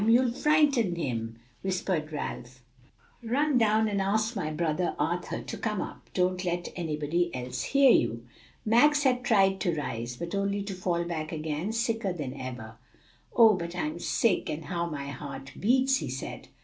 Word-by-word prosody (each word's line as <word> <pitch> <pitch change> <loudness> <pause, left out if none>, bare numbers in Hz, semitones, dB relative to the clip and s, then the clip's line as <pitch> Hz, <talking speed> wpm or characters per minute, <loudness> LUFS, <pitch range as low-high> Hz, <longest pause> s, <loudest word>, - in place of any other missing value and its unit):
you'll 240 +1 +5
frighten 280 - +3
him," 115 -8 -3 0.3
whispered 185 -4 -1
Ralph. 130 -4 -6 0.6
"Run 260 +4 +2
down 220 -1 +3
and 200 -2 0
ask 215 +4 +1
my 175 -7 -2
brother 160 +2 -1
Arthur - - -2
to - - -6
come - - -1
up. - - -7
Don't 180 0 +1
let 175 -1 -2
anybody 165 +1 -1
else 125 0 -4
hear 275 -2 +5
you." 115 - +2 0.4
Max 290 +7 +5
had 250 -2 +2
tried 195 -5 +3
to 175 -4 0
rise, 120 -4 -4
but 170 +5 -5
only 200 0 0
to 200 0 -5
fall 180 -2 -1
back 160 -2 -4
again 155 +4 -3
sicker 225 -3 -1
than 145 -7 -5
ever. 125 -5 -7 0.6
"Oh, 225 -2 +8
but 170 -2 -4
I'm 165 -1 -2
sick, 190 0 +1
and 155 0 -4
how 170 +2 -2
my 140 -3 -5
heart 140 0 -7
beats!" 260 +4 +3
he 145 - -4
said. 130 +1 -6
175 Hz, 165 wpm, -28 LUFS, 150-220 Hz, 0.6 s, Oh